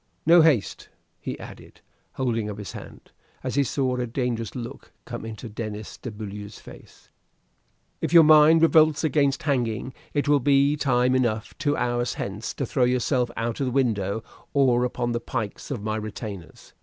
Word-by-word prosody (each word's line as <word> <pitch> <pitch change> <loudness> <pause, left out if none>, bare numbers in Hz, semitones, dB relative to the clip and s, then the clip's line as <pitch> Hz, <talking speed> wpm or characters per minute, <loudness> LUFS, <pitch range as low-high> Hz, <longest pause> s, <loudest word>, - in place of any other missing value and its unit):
No 170 +2 +7
haste!" 145 -11 +1 0.3
he - - -6
added, - - -12 0.3
holding 115 -5 -1
up 105 - -6
his 105 -2 -7
hand, - - -11 0.3
as - - -3
he 140 - +3
saw 130 0 -1
a 125 -1 -2
dangerous 115 -2 -3
look 120 -2 -8
come - - -6
into 115 +2 -7
Denis 110 -1 -6
de 125 - -7
Beaulieu's 105 -1 -8
face. - - -15 0.9
"If - - -2
your 170 -1 +8
mind 155 +1 +7
revolts 155 -2 +5
against 140 -3 +1
hanging, 125 -4 -1 0.2
it 145 - 0
will 145 0 +4
be 140 +2 +3
time 125 -3 +2
enough 120 -4 0
two 145 0 0
hours 120 0 -1
hence 100 +3 -5
to 135 - -2
throw 125 +1 +1
yourself 125 0 +1
out 115 0 -2
of 135 - 0
the - - -1
window 110 -5 0 0.3
or 125 -3 +3
upon 120 -1 -2
the 120 - -1
pikes 110 -3 -5
of 125 -8 -4
my 110 0 -2
retainers. 105 -5 -8
125 Hz, 170 wpm, -25 LUFS, 110-140 Hz, 0.9 s, your